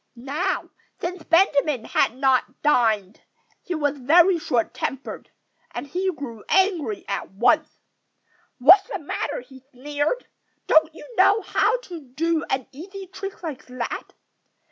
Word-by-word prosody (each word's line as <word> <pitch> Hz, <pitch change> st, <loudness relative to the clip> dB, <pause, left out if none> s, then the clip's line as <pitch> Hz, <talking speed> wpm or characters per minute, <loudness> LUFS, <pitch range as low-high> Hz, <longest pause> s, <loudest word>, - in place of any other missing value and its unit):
Now, 295 Hz, +10 st, -2 dB, 0.3 s
since 355 Hz, 0 st, -4 dB
Benjamin 305 Hz, -, +2 dB
had 235 Hz, -, +1 dB
not 265 Hz, -1 st, +3 dB
yet 255 Hz, -, -32 dB
dined, 220 Hz, -9 st, +2 dB, 0.4 s
he 355 Hz, -, -4 dB
was 290 Hz, -2 st, -1 dB
very 340 Hz, +7 st, +5 dB
short 240 Hz, -7 st, 0 dB
tempered. 270 Hz, 0 st, -5 dB, 0.4 s
And -, -, -6 dB
he 370 Hz, +6 st, -1 dB
grew 240 Hz, -, -8 dB
angry 385 Hz, 0 st, +1 dB
at -, -, -3 dB
once. -, -, +2 dB, 0.9 s
"What's 370 Hz, +10 st, +7 dB
the -, -, -3 dB
matter?" 335 Hz, +9 st, -4 dB
he 265 Hz, -, -15 dB
sneered. 290 Hz, -, -2 dB, 0.4 s
"Don't 315 Hz, 0 st, +4 dB
you -, -, -11 dB
know 400 Hz, +3 st, +5 dB
how -, -, +2 dB
to 355 Hz, -8 st, -8 dB
do 315 Hz, +5 st, -1 dB
an 260 Hz, -2 st, -1 dB
easy 380 Hz, +7 st, -9 dB
trick 390 Hz, -1 st, -7 dB
like 305 Hz, -6 st, -6 dB
that? 250 Hz, -1 st, -5 dB
305 Hz, 140 wpm, -23 LUFS, 265-370 Hz, 0.9 s, What's